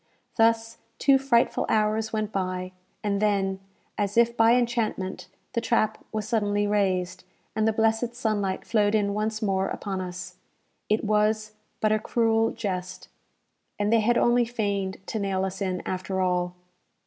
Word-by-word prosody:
Thus 225 0 +2 0.2
two 275 -1 +4
frightful 255 -3 +2
hours 220 0 +1
went 215 -1 -2
by; 185 -2 -2 0.3
and 200 -1 0
then, 195 -2 +1 0.4
as 205 +1 -1
if 235 0 +4
by 230 +1 +5
enchantment, 220 -7 -1 0.3
the 235 - 0
trap 230 -2 0
was 215 -1 -3
suddenly 205 -2 +1
raised, 190 -3 0 0.3
and 220 0 +2
the - - +4
blessed 225 +2 +1
sunlight 205 -5 -1
flowed 210 -2 +2
in 200 -1 +1
once 215 +1 -2
more 195 -1 +1
upon 195 -2 -4
us. 180 0 -7 0.5
It 215 +1 +2
was, 215 0 +1 0.3
but 215 - +3
a 215 - +3
cruel 225 0 +2
jest, 185 -4 -5 0.7
and 205 +2 +1
they 230 - +5
had 235 +2 +2
only 240 0 +4
feigned 200 -5 -2
to 220 - -3
nail 190 -1 0
us 190 +1 -5
in, 185 -2 -2
after 185 +1 -3
all! 180 -1 0
210 Hz, 155 wpm, -26 LUFS, 190-225 Hz, 0.7 s, by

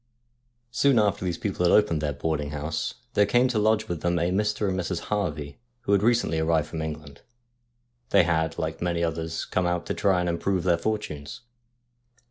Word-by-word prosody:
Soon 135 0 +3
after 100 -3 +2
these 90 -2 -2
people 95 -3 -2
had 85 - +4
opened 105 -7 +3
their 75 -1 -1
boarding 75 +1 -2
house, 75 +2 -3 0.2
there 105 -1 +4
came 120 +4 +4
to 115 -4 0
lodge 110 +1 +2
with 85 -5 -4
them 85 0 +1
a 85 +1 +1
Mr. 105 +2 0
and 95 - 0
Mrs. 90 -1 -2
Harvey, 75 -9 -2 0.2
who 120 - -2
had 100 -1 +4
recently 115 -7 +2
arrived 80 -1 +1
from 80 - -4
England. 75 -2 -7 0.9
They - - +5
had, 80 -1 0
like 80 0 -3
many 85 -1 0
others, 80 0 -2
come 90 -1 0
out 85 0 -1
to - - -2
try 95 -3 +2
and 90 - -1
improve 85 +1 0
their 85 -2 +2
fortunes. 105 -1 -4
85 Hz, 190 wpm, -26 LUFS, 80-105 Hz, 0.9 s, They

